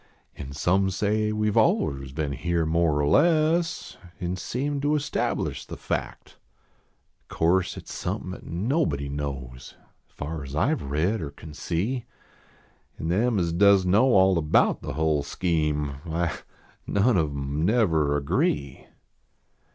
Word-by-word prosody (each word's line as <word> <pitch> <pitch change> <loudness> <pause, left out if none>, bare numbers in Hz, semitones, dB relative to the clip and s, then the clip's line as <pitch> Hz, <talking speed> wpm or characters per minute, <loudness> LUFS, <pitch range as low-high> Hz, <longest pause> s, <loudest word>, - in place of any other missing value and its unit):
An 70 -1 -8
some 90 +7 +1
say 105 +3 0
we 105 0 0
ve - - +3
aliens 70 -2 +1
been 75 0 -2
here 85 +2 -1
more 80 -2 +2
or 70 - +1
less, 165 - +2 0.2
An 90 -1 -2
seem 140 +9 -3
to 145 +1 +2
establish 150 0 -2
the - - -9
fact. - - -5 0.9
O - - -9
course 85 +2 +2
at - - -8
s - - -11
somepin - - -4
at - - -10
nobody 85 - -1
knows, 65 -3 -6 0.3
As - - -33
far 75 0 -5
as 70 +1 -7
I 110 - +2
ve 155 - -4
read 80 +10 0
or 75 - -4
cnn 75 +1 -12
see; 105 - -2 0.9
An 80 - -4
them 110 +6 +2
as 85 -3 0
does 100 +1 +5
know 100 +7 +4
all 95 -2 +5
about 75 -1 +2
the - - -5
hull 80 0 +1
scheme, 75 -4 -1
Why, 85 0 -1 0.5
none 105 +4 +2
of 80 -4 +2
em 70 +2 -3
never 80 -9 +2
agree. 70 -1 -1
85 Hz, 150 wpm, -25 LUFS, 75-105 Hz, 0.9 s, does